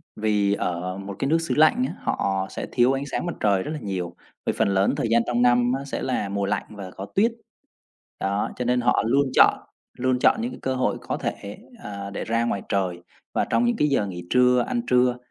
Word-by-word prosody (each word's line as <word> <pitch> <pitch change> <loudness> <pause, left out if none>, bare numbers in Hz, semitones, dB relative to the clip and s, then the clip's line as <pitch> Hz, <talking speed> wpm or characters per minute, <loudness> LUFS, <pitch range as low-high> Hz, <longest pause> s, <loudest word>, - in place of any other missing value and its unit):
vì 105 -2 +1
ở 90 -1 -2
một 100 0 -7
cái 135 - 0
nước 165 - +4
xứ 165 - -2
lạnh 155 +12 +4
á, - - -6
họ 95 -1 -1
sẽ - - -5
thiếu 125 +1 +3
ánh 135 +1 -2
sáng - - -2
mặt 175 - -2
trời 100 -3 +2
rất 150 - -5
là 155 - -4
nhiều, 90 -4 -4 0.3
vì - - +1
phần - - +3
lớn 95 0 +2
thời 135 - 0
gian 115 0 +5
trong 120 0 +1
năm 120 0 +4
á 140 - -7
sẽ - - -4
là 115 -6 -1
mùa 100 0 -1
lạnh 100 - -1
và 100 -3 -9
có 95 - -7
tuyết. 225 +5 +4 0.9
Đó, 100 +1 -1
cho 125 - -3
nên 125 +1 +2
họ 120 - +2
luôn 140 +4 +3
chọn - - +6 0.4
luôn 130 0 +1
chọn 225 - +3
những 240 +2 -2
cái - - -9
cơ 130 0 -1
hội 130 - 0
có - - -3
thể, 100 +1 -5 0.3
ờ, 100 -1 -6
để 100 - -5
ra 115 +1 +1
ngoài 100 -4 -1
trời. 90 -3 -1 0.3
Và - - +1
trong 240 - +2
những 240 0 +2
cái 150 - +3
giờ 135 -7 +1
nghỉ 90 -2 -7
trưa, 125 -1 +4
ăn 240 - -1
trưa 125 0 +3
115 Hz, 240 wpm, -24 LUFS, 100-130 Hz, 0.9 s, chọn